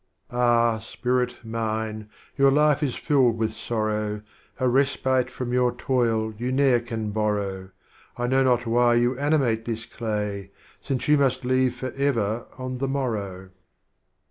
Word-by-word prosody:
Ah, 120 -2 +3
Spirit 125 +2 -1
Mine, 110 -1 -3 0.3
your 140 0 +5
Life 150 +1 +3
is 140 -5 -1
filled 130 -6 +2
with 110 -1 -1
Sorrow, 105 -1 -2 0.4
A 130 - +2
Respite 130 -1 +2
from 125 -1 -5
j 125 - +1
^our 125 -1 +1
Toil 115 -4 0
you 125 +2 -2
ne'er 130 -2 +4
can 115 -3 -4
borrow, 100 -3 -2 0.5
I 120 - -1
know 130 +2 +2
not 125 -2 +2
why 120 +1 +3
you 120 +2 +2
animate 135 -7 +1
this 115 -1 -4
Clay, 105 -4 -4 0.3
Since 135 -3 -3
You 150 -1 +5
must 130 -2 +1
leave 130 -1 +2
forever 120 -4 -1
on 130 -1 -5
the 135 - -1
Morrow. 105 -9 -3
120 Hz, 145 wpm, -25 LUFS, 110-130 Hz, 0.5 s, your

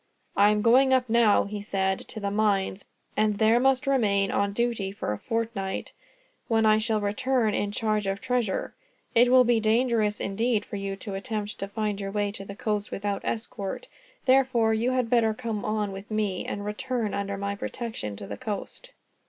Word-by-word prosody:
"I 205 +1 +6
am 210 0 +1
going 260 +3 +5
up 255 -1 +1
now," 230 -2 +4
he 205 0 -5
said, 190 -2 0
"to 220 - -7
the 200 -1 -2
mines, 200 -2 +1 0.3
and 215 -1 +2
there 220 +2 +4
must 265 +2 +3
remain 205 -8 +2
on 200 0 +1
duty 225 -3 -1
for 195 - -3
a 105 - -6
fortnight, 225 -4 -3 0.5
when 225 -1 +2
I 215 0 +5
shall 220 -1 +1
return 220 +2 +1
in 205 - -1
charge 215 -1 0
of 195 0 -1
treasure. 245 -5 -1 0.4
It 240 +1 +5
will 255 0 +7
be 240 -1 +3
dangerous, 220 -1 +2
indeed, 220 +2 0
for - - -7
you 195 0 -3
to 200 +1 -7
attempt 210 +1 -4
to 195 - -3
find 205 0 -2
your 195 - -3
way 205 0 -1
to 195 - -7
the 195 0 -8
coast 210 -1 -2
without 200 0 -2
escort. 220 - -4 0.4
Therefore 255 -4 +4
you 225 +3 +1
had 255 -2 +1
better 225 -2 +2
come 225 -3 -4
on 210 -1 -1
with 195 +1 -9
me, 210 -4 -1
and 205 0 -4
return 225 +1 -2
under 200 0 -2
my 200 0 -2
protection 200 - -5
to 100 - -8
the 100 0 -6
coast." 215 - -6
215 Hz, 190 wpm, -26 LUFS, 200-235 Hz, 0.5 s, will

